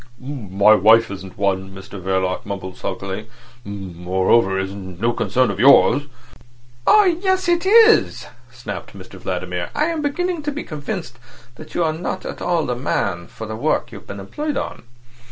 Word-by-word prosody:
"My 105 Hz, -7 st, +2 dB
wife 110 Hz, +2 st, +5 dB
isn't 95 Hz, -1 st, -9 dB
one," 95 Hz, -1 st, 0 dB
Mr 95 Hz, 0 st, -9 dB
Verloc 95 Hz, 0 st, -1 dB
mumbled 95 Hz, -2 st, -6 dB
sulkily. 95 Hz, +4 st, -5 dB, 0.4 s
"Moreover, 95 Hz, +1 st, 0 dB
it's 95 Hz, 0 st, -3 dB
no 100 Hz, +4 st, -3 dB
concern 115 Hz, +2 st, +1 dB
of 100 Hz, -, -6 dB
yours." 140 Hz, +3 st, +6 dB, 0.8 s
"Oh 425 Hz, -, +7 dB
yes, 375 Hz, +1 st, +1 dB
it 345 Hz, +1 st, +2 dB
is," 450 Hz, +2 st, +5 dB, 0.3 s
snapped -, -, -8 dB
Mr -, -, -12 dB
Vladimir. -, -, -3 dB
"I 300 Hz, +1 st, +2 dB
am 330 Hz, -2 st, -2 dB
beginning 345 Hz, +4 st, -1 dB
to 295 Hz, 0 st, -2 dB
be 295 Hz, +2 st, -5 dB
convinced 155 Hz, -, -6 dB, 0.3 s
that 155 Hz, +5 st, -13 dB
you 175 Hz, -, +2 dB
are 160 Hz, -1 st, +1 dB
not 165 Hz, +3 st, -4 dB
at -, -, -6 dB
all 170 Hz, -2 st, +1 dB
the 125 Hz, -, -2 dB
man 95 Hz, -9 st, -2 dB
for 110 Hz, -, -8 dB
the 110 Hz, 0 st, -5 dB
work 120 Hz, -1 st, 0 dB
you've 100 Hz, -4 st, -11 dB
been 100 Hz, -, -7 dB
employed 295 Hz, -, -4 dB
on. -, -, -4 dB
115 Hz, 165 wpm, -20 LUFS, -, 0.8 s, Oh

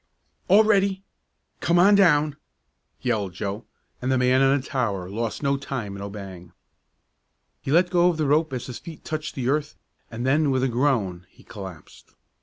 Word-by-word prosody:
"All 200 Hz, +4 st, +6 dB
ready! 195 Hz, -2 st, +2 dB, 0.6 s
Come 170 Hz, -, +2 dB
on 195 Hz, +4 st, +6 dB
down!" 155 Hz, -7 st, +4 dB, 0.7 s
yelled 100 Hz, -4 st, -1 dB
Joe, 100 Hz, +1 st, -4 dB, 0.4 s
and 130 Hz, +1 st, -1 dB
the 130 Hz, -, +3 dB
man 125 Hz, +1 st, +3 dB
on 135 Hz, +1 st, +4 dB
the 130 Hz, -, -10 dB
tower 105 Hz, -9 st, -2 dB
lost 115 Hz, +5 st, -3 dB
no 140 Hz, 0 st, +1 dB
time 130 Hz, -8 st, -5 dB
in 100 Hz, -, -8 dB
obeying. 95 Hz, -4 st, -9 dB, 1.1 s
He 135 Hz, -, -4 dB
let 175 Hz, +3 st, +3 dB
go 175 Hz, 0 st, +4 dB
the 155 Hz, -2 st, -2 dB
rope 150 Hz, +2 st, +2 dB
as 125 Hz, -2 st, -4 dB
his 125 Hz, -, -7 dB
feet 165 Hz, -2 st, -11 dB
touched 155 Hz, 0 st, -4 dB
the 125 Hz, -2 st, -3 dB
earth 150 Hz, +2 st, -1 dB, 0.3 s
and 120 Hz, +2 st, -5 dB
then 145 Hz, +3 st, +2 dB
with 130 Hz, -1 st, +1 dB
a -, -, +3 dB
groan 115 Hz, -9 st, 0 dB
he -, -, -21 dB
collapsed. 95 Hz, -6 st, -11 dB
135 Hz, 175 wpm, -24 LUFS, 105-155 Hz, 1.1 s, All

